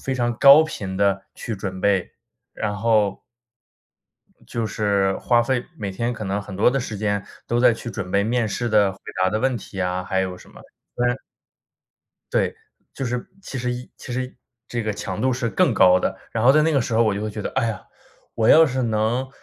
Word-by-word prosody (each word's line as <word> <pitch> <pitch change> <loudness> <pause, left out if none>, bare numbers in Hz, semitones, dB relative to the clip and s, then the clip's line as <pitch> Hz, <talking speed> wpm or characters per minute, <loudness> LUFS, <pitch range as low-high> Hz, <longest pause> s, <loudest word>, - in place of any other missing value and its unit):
非 135 - -2
常 120 -1 0
高 140 +3 +9
频 100 -11 -5
地 100 -1 +1
去 110 -4 -5
准 95 -2 -5
备， 100 -2 +1 0.4
然 105 -1 -3
后， 105 -2 +1 1.2
就 115 -1 -3
是 100 -2 +1
花 120 -1 +2
费 125 0 -1
每 100 -3 -4
天 120 +5 -2
可 110 - -7
能 100 +1 -1
很 100 -1 -9
多 105 +5 +4
的 135 - 0
时 115 -4 -4
间 100 -1 -1 0.2
都 120 - +1
在 125 -1 +6
去 120 +1 -7
准 90 -4 -5
备 100 0 +3
面 115 +1 0
试 120 +3 -2
的 105 -3 +3
回 95 - -16 0.2
答 95 - +4
的 110 +2 -1
问 130 -1 +1
题 95 -2 -7
啊， 90 0 -1
还 95 +1 0
有 95 -1 -3
什 - - -16
么 - - -15 0.3
虽 120 - -1
然 120 +1 +2 1.2
对， - - +1 0.4
就 135 - -4
是 120 0 -3 0.2
其 135 - -6
实 125 0 -1
一 125 0 -7
其 125 - -8
实， 130 +1 -4 0.3
这 120 -1 -2
个 110 0 -1
强 100 - -5
度 130 0 +2
是 120 -2 -1
更 100 - +2
高 90 -1 +6
的， - - -1 0.2
然 115 - -1
后 130 - +7
在 155 +1 +4
那 160 0 +2
个 140 - +3
时 115 -1 -2
候 115 - +4
我 105 -3 +2
就 100 - -3
会 110 - -3
觉 105 - -6
得： - - -3
“哎 115 - +1
呀， 110 -4 -4 0.5
我 110 - +1
要 160 0 +8
是 130 -1 -1
能 115 +3 0
110 Hz, 240 characters per minute, -22 LUFS, 100-125 Hz, 1.2 s, 高